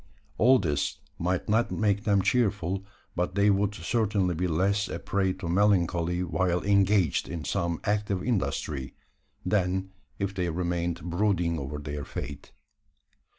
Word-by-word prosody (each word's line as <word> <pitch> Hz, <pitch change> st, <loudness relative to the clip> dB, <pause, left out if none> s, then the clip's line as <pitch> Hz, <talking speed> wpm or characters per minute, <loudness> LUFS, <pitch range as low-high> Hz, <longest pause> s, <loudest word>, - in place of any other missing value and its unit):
All 130 Hz, +4 st, +6 dB
this 75 Hz, -, -1 dB, 0.2 s
might 90 Hz, +1 st, -1 dB
not 110 Hz, +3 st, +2 dB
make 100 Hz, -1 st, 0 dB
them 100 Hz, -3 st, +3 dB
cheerful; 100 Hz, -6 st, +1 dB, 0.3 s
but 90 Hz, +1 st, -1 dB
they 100 Hz, +1 st, +4 dB
would 100 Hz, +1 st, +1 dB
certainly 100 Hz, 0 st, 0 dB
be 90 Hz, +3 st, -1 dB
less 100 Hz, +5 st, +1 dB
a -, -, -3 dB
prey 95 Hz, -1 st, 0 dB
to 95 Hz, -2 st, -7 dB
melancholy 90 Hz, -2 st, +2 dB
while 90 Hz, +1 st, 0 dB
engaged 100 Hz, -5 st, +3 dB
in 85 Hz, -3 st, -5 dB
some 85 Hz, -1 st, -1 dB
active 105 Hz, -3 st, 0 dB
industry, 75 Hz, -, -2 dB, 0.5 s
than 95 Hz, 0 st, 0 dB, 0.3 s
if 100 Hz, -1 st, -2 dB
they 90 Hz, -3 st, -1 dB
remained 85 Hz, 0 st, -2 dB
brooding 85 Hz, -2 st, 0 dB
over 70 Hz, +2 st, -5 dB
their 75 Hz, 0 st, -5 dB
fate. -, -, -7 dB
95 Hz, 140 wpm, -28 LUFS, 85-100 Hz, 0.5 s, All